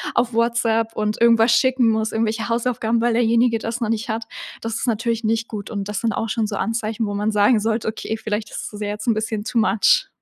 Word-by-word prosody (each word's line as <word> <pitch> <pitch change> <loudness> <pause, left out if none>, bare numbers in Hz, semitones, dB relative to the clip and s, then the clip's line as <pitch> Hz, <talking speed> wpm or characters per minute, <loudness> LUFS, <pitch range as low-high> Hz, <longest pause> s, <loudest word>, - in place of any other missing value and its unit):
auf 240 0 +1
WhatsApp 230 -1 +1
und 215 +1 -2
irgendwas 230 0 +5
schicken 260 -2 +3
muss, 220 0 0
irgendwelche 225 +1 -1
Hausaufgaben, 235 -1 0
weil 240 0 +2
derjenige 230 0 +3
das 230 +2 -4
noch 225 - -1
nicht 225 +2 -2
hat. 225 +1 -2 0.4
Das 225 -1 -3
ist 250 - -3
natürlich 230 0 -1
nicht 225 +1 0
gut. 205 -3 -6
Und 200 -2 -4
das 210 - -3
sind 230 - +1
auch 225 - -2
schon 220 0 0
so 205 -1 -4
Anzeichen, 225 0 -2
wo 205 - -3
man 210 +2 0
sagen 210 +2 +4
sollte: 220 +1 -1
„Okay, 220 0 -4
vielleicht 215 -1 -3
ist - - -6
es 210 - -8
jetzt' 210 +3 -4
n 230 - +4
bisschen 215 -1 -3
too 235 - 0
much.“ 210 -1 +3
225 Hz, 230 wpm, -21 LUFS, 215-230 Hz, 0.4 s, irgendwas